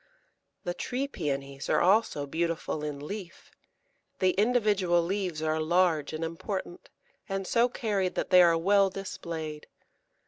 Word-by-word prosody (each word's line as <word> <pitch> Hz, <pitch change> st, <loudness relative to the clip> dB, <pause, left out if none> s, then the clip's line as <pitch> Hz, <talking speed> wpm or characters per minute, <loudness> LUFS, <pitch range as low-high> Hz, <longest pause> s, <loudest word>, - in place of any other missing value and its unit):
The 175 Hz, -, -2 dB
Tree 260 Hz, +8 st, -3 dB
Pæonies 140 Hz, -, -4 dB
are -, -, +3 dB
also 190 Hz, -6 st, +3 dB
beautiful 165 Hz, 0 st, -2 dB
in 145 Hz, -1 st, -5 dB
leaf; 190 Hz, 0 st, -8 dB, 0.7 s
the 185 Hz, -1 st, +3 dB
individual 205 Hz, -5 st, +2 dB
leaves 180 Hz, -3 st, -2 dB
are 155 Hz, 0 st, 0 dB
large 165 Hz, -2 st, +2 dB
and 160 Hz, +1 st, -4 dB
important, 175 Hz, +2 st, -5 dB, 0.4 s
and 195 Hz, 0 st, -2 dB
so 235 Hz, +5 st, +3 dB
carried 205 Hz, -7 st, -1 dB
that -, -, -2 dB
they 180 Hz, -1 st, +8 dB
are 170 Hz, -1 st, +5 dB
well 195 Hz, +3 st, +4 dB
displayed. 165 Hz, -6 st, -6 dB
175 Hz, 135 wpm, -28 LUFS, 160-200 Hz, 0.7 s, they